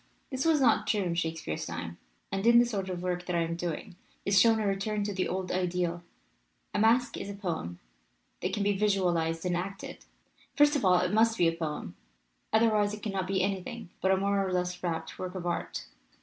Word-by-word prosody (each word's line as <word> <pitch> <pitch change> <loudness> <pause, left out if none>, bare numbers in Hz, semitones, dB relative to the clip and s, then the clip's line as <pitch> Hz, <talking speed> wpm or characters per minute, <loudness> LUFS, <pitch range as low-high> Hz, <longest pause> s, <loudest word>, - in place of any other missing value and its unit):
"This 260 +2 -2
was 320 -2 +4
not 230 -5 +3
true 210 -1 +2
in 175 -2 -1
Shakespeare's 160 - -3
time. 85 +1 -6 0.3
And 195 +3 -1
in 235 0 +7
the 240 - +7
sort 200 -5 -3
of 180 -1 -4
work 180 -1 -2
that 180 - -1
I 170 - +2
am 165 0 -2
doing 175 +2 -4 0.3
is 200 0 +5
shown 225 -1 +5
a 215 - -1
return 205 +1 -1
to 205 0 -2
the 185 -1 -1
old 185 -1 -3
ideal. 180 -1 -1 0.7
A - - 0
masque 230 +2 +3
is 200 - -5
a 200 - -5
poem 165 - -4 0.6
that 185 - -1
can 205 0 -1
be 205 0 +2
visualized 180 -5 +1
and 180 -1 +1
acted. 195 +3 -5 0.5
First 295 0 +5
of 285 - 0
all 180 -2 +5
it 180 +2 -1
must 225 +1 +4
be 175 - +4
a - - +3
poem, 160 -2 -5 0.6
otherwise 215 -2 +3
it 210 - -14
cannot 195 -4 -2
be 190 -1 +1
anything 190 -2 -3
but 190 - +2
a 190 - +4
more 200 +1 +1
or 190 - -2
less 180 0 -1
warped 165 -2 -4
work 185 0 -5
of 180 -2 -5
art. 175 - -3
190 Hz, 215 wpm, -29 LUFS, 175-210 Hz, 0.7 s, in